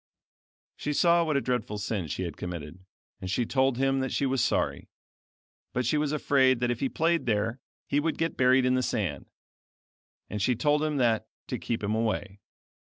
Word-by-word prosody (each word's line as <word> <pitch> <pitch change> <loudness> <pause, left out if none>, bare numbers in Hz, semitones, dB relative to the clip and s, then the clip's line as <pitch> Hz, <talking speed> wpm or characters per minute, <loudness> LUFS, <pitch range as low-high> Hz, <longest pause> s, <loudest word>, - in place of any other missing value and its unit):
She 150 - -2
saw 170 +2 +4
what 155 -3 +1
a - - +1
dreadful 125 -5 -2
sin 100 -4 -2
she 85 - -3
had 85 -4 -5
committed, 85 -1 -6 0.4
and 95 - -6
she 120 +5 0
told 130 0 +1
him 135 0 +2
that 130 -1 -2
she 140 - 0
was 135 -1 +1
sorry; - - 0 0.8
but 125 0 0
she 125 - +1
was 150 -1 +1
afraid 135 -4 +3
that 120 0 +1
if 120 - -3
he 135 - 0
played 165 -2 +1
there 110 +3 0 0.3
he 145 - +1
would 160 +2 -1
get 165 0 -1
buried 130 0 +4
in 125 - +3
the 130 - +2
sand, - - -2 1.0
and 105 - -4
she 125 +5 +2
told 145 +5 +2
him 155 -1 0
that 115 -4 +2 0.2
to - - -2
keep 115 -2 -3
him 100 +1 0
away. 110 -3 -2
125 Hz, 195 wpm, -28 LUFS, 110-140 Hz, 1.0 s, saw